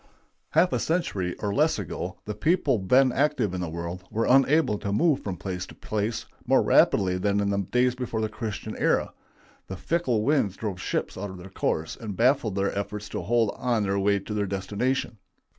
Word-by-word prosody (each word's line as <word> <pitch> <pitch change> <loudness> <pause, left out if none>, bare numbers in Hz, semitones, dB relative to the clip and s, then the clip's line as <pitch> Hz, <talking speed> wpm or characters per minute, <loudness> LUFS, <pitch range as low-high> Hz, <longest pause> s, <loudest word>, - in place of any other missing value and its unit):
Half 170 +3 +4
a - - +1
century 105 - -1
or 100 -1 -1
less 155 +5 +2
ago, 100 -6 -5
the 105 - -3
people 145 - +1
then 125 +7 +4
active 125 -8 +1
in 90 - -3
the 85 - -3
world 85 +2 -5
were 115 +1 0
unable 135 -3 +4
to 100 - -3
move 150 +6 +3
from 95 -3 -5
place 90 0 -5
to - - -13
place 110 +1 -3 0.2
more - - +4
rapidly 90 -1 +3
than 100 +1 +1
in 100 0 +1
the 100 - 0
days 125 0 +3
before 125 -3 -3
the 110 - 0
Christian 110 -1 -5
era. - - +1 0.5
The 95 - -6
fickle 125 - 0
winds 120 -8 +1
drove 100 -5 -4
ships - - -2
out 100 +1 -4
of 95 - -9
their 90 +2 -11
course 80 0 -1
and 105 -4 -7
baffled 120 -4 +2
their 100 0 0
efforts 100 +1 -4
to - - -4
hold 115 -2 +1
on 120 -4 0
their 100 0 0
way 100 +1 +3
to 100 +2 -6
their 105 -1 -1
destination. 105 +5 -2
105 Hz, 200 wpm, -26 LUFS, 95-125 Hz, 0.5 s, Half